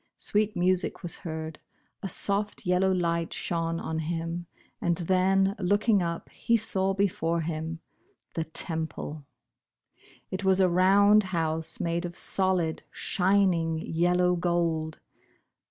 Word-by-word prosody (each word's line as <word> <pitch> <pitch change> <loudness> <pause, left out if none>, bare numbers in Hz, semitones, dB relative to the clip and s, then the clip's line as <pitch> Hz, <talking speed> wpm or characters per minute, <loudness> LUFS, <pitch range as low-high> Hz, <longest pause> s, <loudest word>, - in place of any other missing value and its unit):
Sweet 210 0 0
music 185 +1 0
was 175 -1 -3
heard 160 -1 -6 0.2
— - - -44
a 195 - -4
soft 205 +4 -1
yel 180 0 +2
low 190 0 +3
light 170 -2 0
shone 165 -1 -2
on 160 0 -3
him, 165 +1 -3 0.3
and 170 -1 +1
then, 190 +2 +2
looking 205 +2 +2
up, 170 -1 -3
he 230 - +1
saw 195 -3 +1
before 170 -4 0
him 160 0 -4 0.2
— - - -33
the 165 - -2
Temple. 160 -3 -3 1.0
It 185 +1 -4
was 190 0 +3
a 190 - +5
round 200 +4 +5 0.2
house 160 0 0
made 170 0 -1
of 175 0 -7
solid, 185 -4 +1
shining, 180 -4 +2
yellow 180 +2 +1
gold. 170 -3 -1
175 Hz, 135 wpm, -27 LUFS, 165-190 Hz, 1.0 s, a